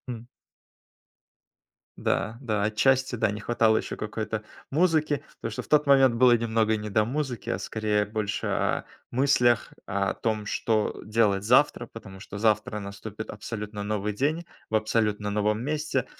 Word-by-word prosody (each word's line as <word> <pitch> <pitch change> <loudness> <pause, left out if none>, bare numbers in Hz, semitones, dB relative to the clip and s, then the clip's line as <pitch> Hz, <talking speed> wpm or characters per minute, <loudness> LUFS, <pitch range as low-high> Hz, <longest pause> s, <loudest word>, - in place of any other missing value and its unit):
Хм. 120 -1 -6 1.7
Да, 110 +2 -1
да 105 -5 -1
отчасти, 130 +4 +2
да. 110 -2 +1
Не 105 - -5
хватало 110 0 +2
ещё - - -3
какой-то 110 0 -4 0.3
музыки, 155 -2 +2 0.2
потому 115 - -4
что - - -4
в - - -15
тот 150 -1 +4
момент 135 -3 +6
было 125 0 +6
немного 110 -1 +1
не 105 0 -5
до 105 +1 +2
музыки, 130 -3 -3
а - - 0
скорее 105 -1 0
больше 105 0 -3
о - - 0 0.3
мыслях. 120 -3 +3
О 100 0 0
том, 110 -2 -2
что 110 0 0
делать 105 -3 +2
завтра, 125 0 +4
потому 95 -4 -11
что 100 - -8
завтра 105 +1 +1
наступит 100 +2 -7
абсолютно 105 -1 -6
новый 105 0 -1
день, 150 +10 0 0.3
в 110 - 0
абсолютно 105 -1 +1
новом 105 +2 0
месте, 150 -3 -1
110 Hz, 150 wpm, -27 LUFS, 105-125 Hz, 1.7 s, момент